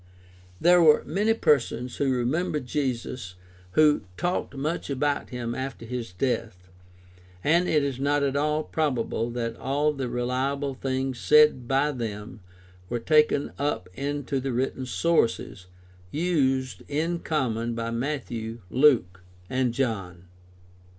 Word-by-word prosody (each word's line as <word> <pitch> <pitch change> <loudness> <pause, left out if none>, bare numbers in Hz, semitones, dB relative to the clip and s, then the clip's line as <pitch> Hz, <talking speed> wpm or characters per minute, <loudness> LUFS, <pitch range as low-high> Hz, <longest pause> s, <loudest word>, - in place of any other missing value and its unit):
There 175 +1 +6
were 155 -2 +6
many 215 +3 +1
persons 125 - +1
who 140 -2 +1
remembered 150 +4 0
Jesus 125 -7 -3
and 90 - -26 0.3
who 150 +2 +5 0.2
talked 175 -4 -2
much 150 +5 -3
about 140 +1 -1
him 120 -2 -4
after 130 -2 -5
his 120 -3 -5
death, 90 -4 -3 0.7
and 170 +4 +3
it 150 -2 +3
is 135 -2 -2
not 145 +1 +1
at 140 -1 0
all 150 +2 +1
probable 125 -7 -1
that 115 -1 -3
all 145 +3 0
the 135 -3 -3
reliable 130 +3 -1
things 130 -1 -2
said 150 -5 +5
by 135 +3 +2
them 110 -3 -6 0.5
were 120 - -1
taken 150 +3 +3
up 145 -9 -1
into 140 +3 -2
the 135 +1 -3
written 130 +1 -2
sources 115 - 0 0.4
used 135 - 0
in 165 +4 -1
common 120 -8 -1
by 115 0 -3
Matthew, 115 -3 -3
Luke, 120 -11 +3 0.3
and 130 -1 +1
John. 100 -9 -2
135 Hz, 130 wpm, -26 LUFS, 120-150 Hz, 0.7 s, There